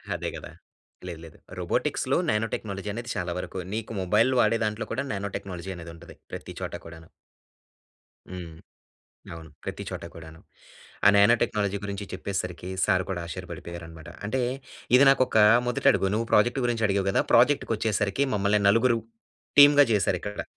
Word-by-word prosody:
అదే - - -3
గదా! - - -9 0.6
లేదు, 85 -2 -7
లేదు. 80 - -14 0.2
రోబోటిక్స్‌‌లో - - 0
నానో 105 +1 +1
టెక్నాలజీ 100 -1 -4
అనేది 120 +2 -6
చాలా 90 -3 -3
వరకు 95 - -6
నీకు 110 0 -4
మొబైల్ 105 +8 +3
వాడే 115 - +2
దాంట్లో 105 +1 -3
కూడా 140 +3 -2
నానో 100 0 -4
టెక్నాలజీ 95 -1 -7
అనేది 85 -1 -9
ఉంటది. 85 +1 -14 0.2
ప్రతి - - -7
చోట - - -5
కూడాను. 80 -1 -12 1.2
హ్మ్. 85 -3 -8 0.8
అవును 80 -1 -10
ప్రతి - - -5
చోట - - -6
కూడాను. 80 0 -12 0.7
ఆ - - +9
నానో 100 +4 +6
టెక్నాలజీ 100 -1 0
గురించి 100 0 -5
చెప్పేసరికి 90 -2 -4 0.2
సార్ 95 0 +2
కూడా 85 -2 -3
ఆశ్చర్యపడిపోయారు! 85 +1 -8
అన్నమాట. 80 0 -12 0.2
అంటే 125 +5 -1 0.6
ఇది 135 - +6
నాకు 135 -1 +5
ఒక 110 - 0 0.3
మొదటడుగు. 135 -5 +2
నువ్వు 115 +1 -1
ప్రాజెక్ట్ 120 +5 +3
గురించి 115 -2 0
అడిగావు 100 -1 0
కదా! - - +2
ప్రాజెక్ట్‌కొచ్చేసరికి 115 -3 +2
మమ్మల్ని 100 +1 +2
నలుగురు 115 +2 +3 0.6
టీమ్‌గా 145 0 +8
జేసారిక్కడ. 105 0 -1
100 Hz, 150 wpm, -26 LUFS, 90-115 Hz, 1.2 s, ఆ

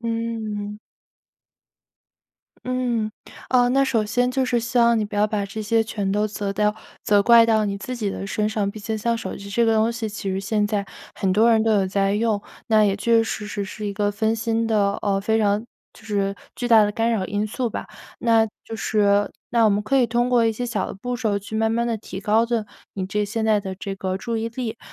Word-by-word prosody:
嗯。 225 -3 -3 1.9
嗯， 240 -4 -1 0.4
呃， 245 -1 +4
那 275 +2 +3
首 225 -5 0
先 245 +4 +1
就 265 +1 0
是 250 -2 +1
希 240 +2 -1
望 235 -1 +5
你 215 - 0
不 205 - -8
要 205 +1 +3
把 210 -1 -2
这 200 +2 -6
些 225 +1 +2
全 205 -3 -3
都 210 +2 +1
责 205 -1 -4
掉 210 +1 +1 0.3
责 205 -1 +4
怪 235 +1 +7
到 220 -2 +2
你 200 0 -2
自 250 +5 -5
己 220 -4 -2
的 195 - -5
身 210 +1 -1
上， 210 -2 -1
毕 215 +1 -10
竟 220 +1 -3
像 230 +2 0
手 225 - -5
机 200 0 -9
这 235 +3 +2
个 225 - +3
东 220 +1 +2
西 225 -1 -3
其 205 -2 -4
实 190 +1 -2
现 210 +1 0
在 205 -1 -2 0.3
很 190 - -1
多 220 +5 +4
人 220 -1 +4
都 225 - +2
有 200 -2 +2
在 195 +1 +1
用， 215 -1 +1 0.3
那 220 -1 +5
也 200 -1 +1
确 235 +3 +1
确 - - +4
实 215 -2 -4
实 205 0 -3
是 210 +2 -6
一 200 - -2
个 205 0 0
分 220 +2 0
心 225 0 -1
的 205 -3 +2
呃， 195 -1 +1
非 220 +2 +1
常 210 0 +2 0.3
就 - - -18
是 200 -2 0 0.2
巨 245 - -2
大 225 -3 +6
的 205 - 0
干 225 +2 0
扰 190 -4 -1
因 205 +2 -1
素 240 +3 -2
吧。 - - -5 0.3
那 225 -1 +3 0.2
就 225 - -7
是 205 -2 +2 0.2
那 235 -3 +4
我 - - +5
们 205 +1 +1
可 270 +6 +2
以 245 - +4
通 240 +2 0
过 235 -2 +4
一 - - +3
些 225 +3 -4
小 230 -5 -2
的 - - -7
步 245 +6 -4
骤 210 -3 0
去 205 +2 -9
慢 220 0 +1
慢 235 +1 0
地 230 -2 -1
提 190 - -8
高 215 +3 +2
的， 230 -3 -1 0.3
你 190 -2 -3
这 210 +1 -1
现 220 +2 -2
在 215 -2 +3
的 190 -1 -5
这 195 +1 -5
个 190 -1 -3
注 230 +3 -3
意 225 +1 -2
力。 230 -1 -5
215 Hz, 260 characters per minute, -23 LUFS, 205-230 Hz, 1.9 s, 怪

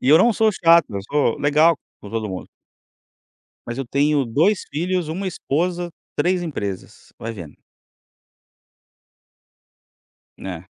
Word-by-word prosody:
e 130 - -1
eu 155 +3 +8
não 235 +6 +5
sou 220 0 +3
chato, 170 -2 +5
eu 100 -2 -3
sou 140 +2 0
legal 150 +3 +4 0.2
com 105 - -10
todo 110 -2 -2
mundo. 95 -1 -6 1.2
Mas 120 - -4
eu 135 - -2
tenho 140 +3 +2
2 160 - +2
filhos, 175 +1 -1
1 185 +5 -3
esposa, 175 +1 -1 0.3
3 180 +1 +2
empresas, 100 - -6
vai 115 - -5
vendo. 85 -9 -10 2.8
Né. 90 -2 -7
150 Hz, 130 wpm, -21 LUFS, 115-175 Hz, 2.8 s, eu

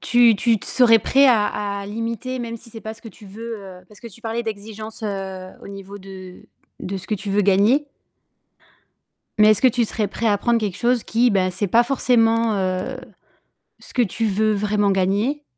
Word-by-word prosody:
Tu 240 -2 +4
tu 225 +2 +2
t - - -10
serais 230 -3 +5
prêt 275 +6 +4
à 225 -5 +4 0.3
à 200 - -7
limiter, 230 +4 -4
même 230 -1 -5
si 230 - -15
c'est 225 - -10
pas 220 0 -7
ce 225 - -21
que 225 - -9
tu 215 - -16
veux? 225 +3 -7 0.3
Parce 210 - -18
que 235 - -9
tu 230 +2 -17
parlais 230 +1 -3
d'exigence, 215 0 -7
heu, 190 -3 -5
au - - -10
niveau 200 0 -9
de 185 -1 -11 0.4
de 195 +2 -4
ce 185 - -9
que 215 - -1
tu 200 0 -6
veux 205 +1 +2
gagner 205 +9 +3 1.5
mais 215 0 +6
est-ce 215 - +3
que 260 - +6
tu 245 0 +1
serais 215 -1 -2
prêt 225 +3 -2
à 205 -1 +3
prendre 235 +2 +1
quelque 205 -5 -3
chose 240 -1 +1
qui, 240 +2 +2
ben, 190 -3 +1
ce 185 - -5
n'est 205 - +2
pas 235 +5 +4
forcément, 230 -3 +2
heu, 190 +6 -2 0.8
ce - - -17
que 250 - +3
tu 225 +1 -1
veux 215 +1 +1
vraiment 205 0 +1
gagner, 200 +10 0
215 Hz, 210 wpm, -21 LUFS, 200-235 Hz, 1.5 s, mais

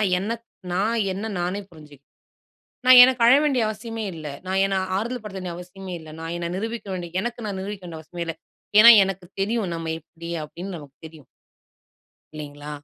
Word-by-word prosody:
நான் 195 -4 +1
என்ன 200 +5 -2 0.4
நான் 210 +6 +1 0.2
என்ன 200 +4 -4
நானே 180 +3 -2
புரிஞ்சிக் 150 -4 -15 0.8
நான் 255 -1 +10
எனக்கு 255 -1 +3
அழ 240 - +8
வேண்டிய 275 -5 +2
அவசியமே 225 +1 -5
இல்ல. 155 -1 -9 0.2
நான் 190 +1 +1
என்னை 195 0 0 0.2
ஆறுதல் 235 +4 -3
படுத்த 195 -2 -6
வேண்டிய 180 -2 -5
அவசியமே 180 +1 -9
இல்ல. 160 - -12
நான் 165 +1 -5
என்ன 170 0 -3
நிரூபிக்க 225 +2 -4
வேண்டிய 175 0 -3
எனக்கு 235 +1 -4
நான் 200 -2 -3
நிரூபிக்க 200 0 -6
வேண்டிய 165 -2 -7
அவசியமே 170 +2 -6
இல்ல. 165 -1 -4 0.4
ஏன்னா 230 +2 +11
எனக்கு 190 -1 -5 0.2
தெரியும். 215 0 0
நம்ம 165 -1 -3
எப்பிடி 170 +1 -11
அப்பிடின்னு 175 +5 -7
நமக்கு 145 -3 -13
தெரியும் 155 -3 -16 1.1
இல்லைங்களா. 145 -1 -8
190 Hz, 180 wpm, -24 LUFS, 165-215 Hz, 1.1 s, ஏன்னா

